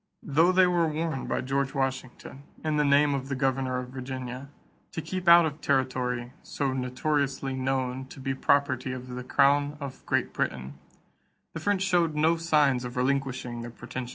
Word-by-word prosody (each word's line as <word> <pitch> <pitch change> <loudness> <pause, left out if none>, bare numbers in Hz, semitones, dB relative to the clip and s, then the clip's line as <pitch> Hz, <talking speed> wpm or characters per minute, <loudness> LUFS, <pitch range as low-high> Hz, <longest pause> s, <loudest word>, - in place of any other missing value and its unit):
Though 160 +5 +3
they 185 0 +5
were 175 -2 +2
warned 155 -2 -2
by - - 0
George 135 +2 -1
Washington, 135 0 -4 0.2
in 155 -1 0
the 150 - +3
name 145 0 +4
of 135 0 -3
the 135 - -1
governor 130 -1 0
of 125 0 -5
Virginia, 130 0 -6 0.4
to - - -3
keep 185 +2 -5
out 170 0 +8
of 155 -1 -4
territory 125 -2 -1
"so 140 -2 -2
notoriously 135 +1 -1
known 130 0 -2
to 135 - -12
be 135 0 -2
property 130 -2 +1
of 125 0 -8
the 125 0 -5
crown 145 +2 +2
of 140 -3 -7
Great - - 0
Britain," 65 +1 -3 0.8
the 165 - -5
French 195 +3 0
showed 175 -4 +2
no 160 +2 +3
signs 150 -6 +2
of 125 0 -6
relinquishing 130 -2 -1
their 120 - -6
pretensions. 120 +1 -7
135 Hz, 175 wpm, -27 LUFS, 130-150 Hz, 0.8 s, out